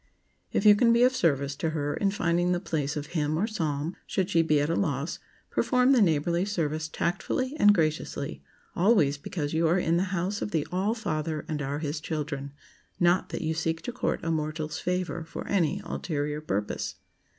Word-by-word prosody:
If 200 - 0
you 210 - +10
can 230 +3 +4
be 235 +1 +5
of 255 +1 +4
service 140 - +1
to 160 - -1
her 145 0 -1
in 200 - +1
finding 175 -2 +1
the 175 - 0
place 150 -5 -2
of 145 - -3
hymn 155 -2 0
or 190 - +2
psalm, 160 -7 -2
should 190 0 -1
she 165 - +4
be 155 -2 +3
at 145 - +1
a 165 - 0
loss, 155 -4 -1 0.3
perform 250 0 +3
the 255 -4 +5
neighborly 170 0 +2
service 155 -6 -1
tactfully 195 - -2
and 205 - +7
graciously,—always 160 0 0
because 150 -1 -4
you 165 +1 +2
are 170 +3 +3
in 170 -2 +2
the 185 - +1
House 190 +2 -2
of - - -2
the 160 -6 0
All 195 +5 0
Father, 155 -7 -3
and 150 -2 -3
are 140 0 -2
His 150 0 -3
children,—not 150 +4 -2
that - - -4
you 160 0 0
seek 160 0 -2
to 245 - -3
court 245 - -1
a 165 - 0
mortal's 155 0 -2
favor 180 -1 -2
for 160 - -7
any 190 0 +1
ulterior 150 -2 -3
purpose. 105 -8 -2
165 Hz, 190 wpm, -28 LUFS, 150-190 Hz, 0.3 s, you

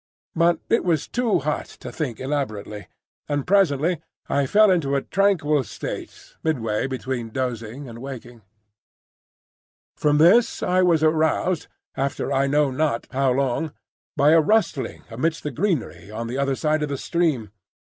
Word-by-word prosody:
But 170 0 +3
it 230 - +2
was 165 -5 0
too 240 -3 +1
hot 150 +2 -2
to - - -7
think 130 -9 -4
elaborately, 110 -8 -4 0.4
and 145 -2 -1
presently 170 -4 +2 0.3
I 140 -1 +1
fell 210 +5 +5
into 145 -6 +1
a 140 - 0
tranquil 160 -8 +2
state - - -8
midway 115 -7 0
between 130 -3 -4
dozing 125 +1 -4
and 115 -1 -9
waking. 125 -3 -8 1.5
From 150 -1 +2
this 225 +10 +4
I 180 +1 +2
was 170 -4 +3
aroused, 160 +2 +1 0.3
after 140 +1 -2
I 135 +1 +2
know 145 0 +2
not 135 -3 0
how 135 0 +1
long, 135 +4 0 0.4
by 145 +2 +5
a 165 0 +6
rustling 205 -6 0
amidst 155 +8 -1
the 150 - -3
greenery 160 - -2
on 110 +2 -5
the 125 +4 -3
other 135 -1 +1
side 155 +2 0
of 150 - -1
the 140 - -2
stream. 150 - -1
145 Hz, 150 wpm, -23 LUFS, 130-165 Hz, 1.5 s, a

